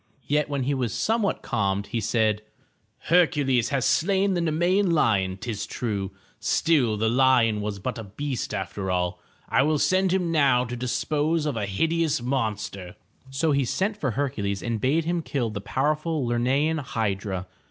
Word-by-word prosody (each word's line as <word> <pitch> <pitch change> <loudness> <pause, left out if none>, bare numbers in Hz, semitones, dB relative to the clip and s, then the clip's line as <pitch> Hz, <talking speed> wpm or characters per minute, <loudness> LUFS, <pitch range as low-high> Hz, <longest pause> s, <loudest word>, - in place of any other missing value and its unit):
Yet 150 +2 +1
when 140 -2 -1
he 140 +3 0
was 125 -4 -1
somewhat 220 - 0
calmed 100 0 0
he 115 - -3
said: 110 -1 +1 0.6
"Hercules 145 -8 +2
has 140 -3 0
slain 195 +3 +2
the 175 - 0
Nemean 175 +5 +2
lion, 100 - +2
'tis 110 0 -4
true, 100 -5 -3 0.3
still, 130 -10 +2
the 110 +2 +1
lion 120 -3 +3
was 105 -1 -3
but 115 +5 -4
a - - -5
beast 125 +5 -4
after 95 +1 -4
all. 90 -1 -1 0.3
I - - +3
will 155 +2 +2
send 185 +4 +2
him 180 -3 +1
now 135 -6 +3
to 120 +1 -5
dispose 150 +6 0
of 145 -4 -1
a 105 -2 -2
hideous 160 +10 +1
monster.'' 110 -7 -3 0.3
So 145 +4 0
he 140 -1 +2
sent 190 - -1
for 145 -10 -2
Hercules 105 -9 -2
and 115 -3 -2
bade 155 +5 +2
him 170 0 0
kill 125 -7 -2
the 100 -1 -5
powerful 150 +5 -1
Ler'ne 120 +1 0 0.2
an 160 - -1
hydra. 100 -7 -2
130 Hz, 170 wpm, -25 LUFS, 105-155 Hz, 0.6 s, lion